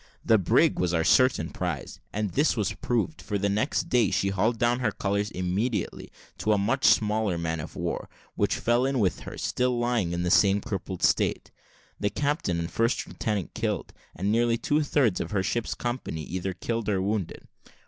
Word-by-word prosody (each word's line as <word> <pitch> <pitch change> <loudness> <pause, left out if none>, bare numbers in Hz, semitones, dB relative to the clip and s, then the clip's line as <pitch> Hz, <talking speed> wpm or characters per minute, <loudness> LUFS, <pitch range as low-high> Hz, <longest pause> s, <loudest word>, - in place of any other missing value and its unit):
The 110 -2 +5
brig 90 - +3
was 90 -1 +1
our 80 - +2
certain 130 -6 +3
prize; 90 -6 -4
and 105 -2 -2
this 145 - +2
was 105 -3 0
proved, 120 +6 -2
for 105 - -2
the 100 +1 0
next 110 +8 0
day 120 -5 +3
she 100 - +1
hauled 105 +5 +1
down 120 +2 +2
her 115 -4 +1
colours 100 +1 -1
immediately 100 +5 -2 0.3
to 110 - +2
a - - +3
much 115 +7 0
smaller 105 -4 +3
man 80 -1 -2
of 75 - -7
war, - - -3 0.2
which - - +1
fell 120 +2 +2
in 135 0 0
with 100 -6 +1
her, - - -8
still 125 -1 0
lying 120 -7 0
in 85 0 -2
the 90 - 0
same 100 +1 +5
crippled 95 -2 -5
state; - - +1 0.5
the 100 - +1
captain 145 - -1
and 85 +1 -3
first 115 +2 +1
lieutenant 105 - -3
killed, - - -2 0.2
and 100 +4 -1
nearly 115 +1 +2
two 145 +6 +1
thirds 135 -9 +2
of - - -3
her 100 -3 0
ship's 120 +4 -1
company 120 -10 -4
either 95 +3 -3
killed 115 +4 -2
or 100 -2 +1
wounded. 100 -1 -3
105 Hz, 190 wpm, -27 LUFS, 95-120 Hz, 0.5 s, The